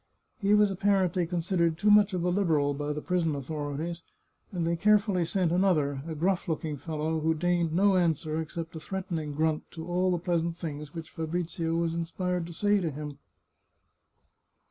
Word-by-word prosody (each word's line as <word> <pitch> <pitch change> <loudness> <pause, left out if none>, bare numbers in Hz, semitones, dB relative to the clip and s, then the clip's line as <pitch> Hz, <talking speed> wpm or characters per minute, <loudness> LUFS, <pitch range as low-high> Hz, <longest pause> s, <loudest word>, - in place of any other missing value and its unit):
He 205 -1 +4
was 210 -1 +4
apparently 185 -3 +1
considered 170 -1 0
too 205 +4 +3
much 210 0 +6
of 175 - -1
a 180 - +2
Liberal 160 -7 +2
by 145 +1 -3
the 150 0 -4
prison 170 -4 0
authorities, 150 +4 -4 0.5
and 175 -4 -2
they 170 +1 +1
carefully 205 -1 +3
sent 170 0 0
another, 155 -7 +2
a 160 - -4
gruflf 180 +4 0
looking 155 -2 -2
fellow, 160 +2 -2
who 160 +1 +1
deigned 175 0 +1
no 195 +4 +4
answer 160 -3 +1
except 165 +1 -6
a - - -4
threatening 165 -3 -4
grunt 155 +1 0
to 160 -1 -8
all 180 +2 +1
the 180 - +2
pleasant 170 -1 -1
things 150 -1 -6
which 165 -1 -7
Fabrizio 165 0 -2
was 165 -1 0
inspired 170 +1 -2
to 170 - -8
say 205 +4 +2
to 170 - 0
him. 145 -1 -7
170 Hz, 175 wpm, -28 LUFS, 160-180 Hz, 0.5 s, much